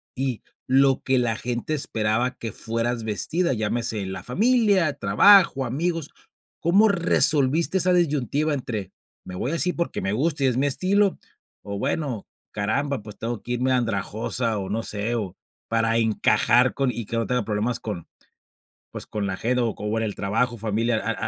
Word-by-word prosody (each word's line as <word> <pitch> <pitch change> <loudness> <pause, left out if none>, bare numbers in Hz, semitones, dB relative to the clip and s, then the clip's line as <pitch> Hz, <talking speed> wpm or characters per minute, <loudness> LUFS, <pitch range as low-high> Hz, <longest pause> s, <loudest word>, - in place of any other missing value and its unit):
y 130 -3 -3 0.2
lo 135 +1 +3
que 130 -1 +2
la 115 -2 +1
gente 120 +5 -3
esperaba 120 -2 0
que 115 - -5
fueras 115 +2 -2
vestida, 135 - 0
llámese, 110 -1 -1
la 95 0 -6
familia, 200 - +2
trabajo, 135 - +5
amigos, 160 +5 -2 0.5
¿cómo 195 +6 +4
resolviste 165 -3 +2
esa 180 0 +3
disyuntiva 150 -2 +1
entre, 110 -8 -5 0.4
me 90 - -7
voy 125 +9 -2
así 175 +2 +1
porque 170 - -3
me 95 - -1
gusta 145 +4 0
y - - +4
es 125 - 0
mi 135 - +2
estilo?, 195 +7 +2 0.5
o 100 0 -5
bueno, 135 -5 -2 0.3
caramba, 120 +6 -1
pues, 105 -1 -11
tengo 115 -2 -4
que 120 - -6
irme 125 +2 0
andrajosa 115 0 -1
o 95 - -5
no 110 +3 -1
sé, 105 +2 -2
o 105 -6 -4 0.3
para 115 0 +2
encajar 120 +2 +3
con, 135 -2 0
y 115 -3 -5
que 115 - -4
no 115 - -1
tenga 125 -1 0
problemas 110 +3 -1
con, 100 -7 -6 0.8
pues, - - -6
con 105 -2 -3
la 95 - -2
GEDO 120 0 0
o - - -6
con 105 +2 -2
el 105 -2 -3
trabajo, 115 +5 -1
familia, 110 +2 0
a 115 - -3
a 110 - -3
120 Hz, 170 wpm, -24 LUFS, 110-145 Hz, 0.8 s, trabajo